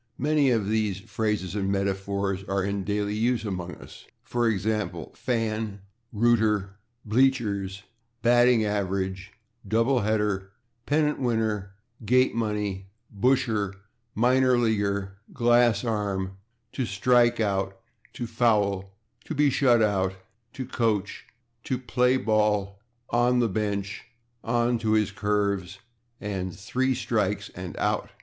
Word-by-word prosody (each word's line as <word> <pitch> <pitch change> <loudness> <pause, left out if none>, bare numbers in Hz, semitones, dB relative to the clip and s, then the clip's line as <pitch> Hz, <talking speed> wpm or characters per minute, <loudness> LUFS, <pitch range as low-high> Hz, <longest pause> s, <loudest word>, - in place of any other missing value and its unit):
Many 145 0 +2
of 110 -5 +1
these 105 -3 0
phrases 105 -3 -2
and 100 -2 -1
metaphors 100 0 -1
are 95 -1 -1
in 100 0 -2
daily 105 +1 -1
use 115 +2 +1
among 90 -3 -4
us, - - -14 0.2
for 120 -1 0
example, 105 -5 -2
/fan/, 110 -4 -2 0.3
/rooter/, 110 -3 +2 0.4
/bleachers/, 105 -5 +1 0.4
/batting 120 -1 +5
average/, 95 -1 -2 0.4
/double 115 +3 +2
header/, 105 -3 0 0.3
/pennant 150 0 +1
winner/, 110 -5 -1 0.3
/gate 125 +4 +3
money/, 105 -4 -2 0.3
/busher/, 110 -4 +1 0.4
/minor 125 +1 +4
leaguer/, 100 -4 0
/glass 120 -2 +3
arm/, 100 -3 -2 0.4
/to 130 -4 -2
strike 120 +4 +3
out/, 100 -3 -1 0.4
/to 120 - -4
foul/, 100 -5 +1 0.3
/to 160 - -5
be 145 -1 +4
shut 120 -4 +4
out/, 95 -3 +1 0.4
/to 130 -2 -5
coach/, 105 -5 -1 0.4
/to 130 - -1
play 125 +2 +3
ball/, 105 -3 +1 0.3
/on 120 +1 +3
the 120 - +3
bench/, 100 -1 -3 0.4
/on 120 +1 +1
to 110 -1 +1
his 105 -2 +2
curves/ 100 -3 -1 0.4
and 95 -3 -4
/three 130 +7 -1
strikes 105 -4 -1
and 90 -1 -8
out - - 0
105 Hz, 120 wpm, -26 LUFS, 100-120 Hz, 0.4 s, batting